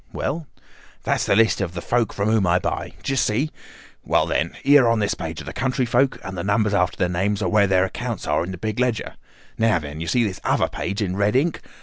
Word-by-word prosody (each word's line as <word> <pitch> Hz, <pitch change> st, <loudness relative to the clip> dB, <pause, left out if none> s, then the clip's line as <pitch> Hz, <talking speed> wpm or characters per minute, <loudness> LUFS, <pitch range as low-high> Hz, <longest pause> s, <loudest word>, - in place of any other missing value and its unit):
"Well?" 160 Hz, 0 st, -3 dB, 0.6 s
"That's -, -, 0 dB
the -, -, +3 dB
list 110 Hz, -1 st, +3 dB
of 90 Hz, -3 st, -3 dB
the -, -, -3 dB
folk 120 Hz, +1 st, 0 dB
from 100 Hz, +1 st, -2 dB
whom 110 Hz, -4 st, +2 dB
I 85 Hz, +1 st, +4 dB
buy. -, -, -3 dB
D'you 135 Hz, -, -1 dB
see? 130 Hz, +5 st, +1 dB, 0.5 s
Well, -, -, +2 dB
then, -, -, -1 dB
here 140 Hz, -2 st, +6 dB
on 115 Hz, 0 st, +3 dB
this 105 Hz, -2 st, +1 dB
page -, -, -6 dB
are -, -, -10 dB
the -, -, -7 dB
country 130 Hz, -1 st, 0 dB
folk, 135 Hz, +3 st, +2 dB
and 95 Hz, -2 st, -6 dB
the 85 Hz, -, -4 dB
numbers 105 Hz, +1 st, +1 dB
after 90 Hz, -3 st, +1 dB
their 90 Hz, -, +1 dB
names 100 Hz, +4 st, -1 dB
are -, -, 0 dB
where 105 Hz, -2 st, +4 dB
their 95 Hz, 0 st, +3 dB
accounts 115 Hz, +2 st, -5 dB
are 75 Hz, +2 st, +1 dB
in 90 Hz, -, -6 dB
the 95 Hz, -, -5 dB
big 110 Hz, +4 st, -3 dB
ledger. 125 Hz, -3 st, -1 dB, 0.5 s
Now, 110 Hz, -4 st, +3 dB
then! 75 Hz, 0 st, -6 dB
You 85 Hz, -, -4 dB
see 120 Hz, +9 st, +2 dB
this 100 Hz, -4 st, -3 dB
other -, -, +2 dB
page 100 Hz, +2 st, -3 dB
in 95 Hz, -1 st, -3 dB
red 100 Hz, +3 st, +1 dB
ink? 150 Hz, +5 st, +1 dB
105 Hz, 245 wpm, -22 LUFS, 95-120 Hz, 0.6 s, here